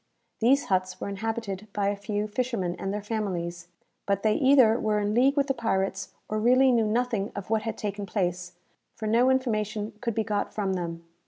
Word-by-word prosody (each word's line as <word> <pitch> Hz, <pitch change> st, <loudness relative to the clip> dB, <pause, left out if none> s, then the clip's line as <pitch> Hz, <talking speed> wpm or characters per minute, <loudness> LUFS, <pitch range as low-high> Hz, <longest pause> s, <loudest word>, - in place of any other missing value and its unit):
These 270 Hz, +5 st, +4 dB
huts 185 Hz, -1 st, 0 dB
were -, -, -4 dB
inhabited 215 Hz, -1 st, -4 dB
by 200 Hz, -1 st, +1 dB
a 205 Hz, -, -1 dB
few 205 Hz, +1 st, -3 dB
fishermen 215 Hz, -6 st, -2 dB
and 195 Hz, +2 st, -2 dB
their 205 Hz, 0 st, -3 dB
families; 175 Hz, -6 st, -3 dB, 0.4 s
but 200 Hz, 0 st, 0 dB
they 215 Hz, -1 st, +4 dB
either 260 Hz, -5 st, +5 dB
were 215 Hz, -1 st, +1 dB
in 205 Hz, 0 st, 0 dB
league 265 Hz, +5 st, +3 dB
with 280 Hz, -, +4 dB
the 270 Hz, -, 0 dB
pirates, 195 Hz, -5 st, -1 dB, 0.2 s
or 215 Hz, -, -2 dB
really 255 Hz, +4 st, +5 dB
knew 230 Hz, -3 st, +3 dB
nothing 225 Hz, -2 st, 0 dB
of 200 Hz, +1 st, -6 dB
what 220 Hz, -1 st, +2 dB
had 225 Hz, 0 st, -4 dB
taken 205 Hz, -1 st, -4 dB
place, 180 Hz, -3 st, -2 dB, 0.4 s
for 220 Hz, -, -6 dB
no 235 Hz, +4 st, +4 dB
information 220 Hz, -4 st, 0 dB
could 235 Hz, -3 st, -2 dB
be 220 Hz, -, +1 dB
got 205 Hz, -2 st, -2 dB
from 195 Hz, -3 st, 0 dB
them. 170 Hz, -2 st, -4 dB
210 Hz, 195 wpm, -27 LUFS, 195-230 Hz, 0.4 s, either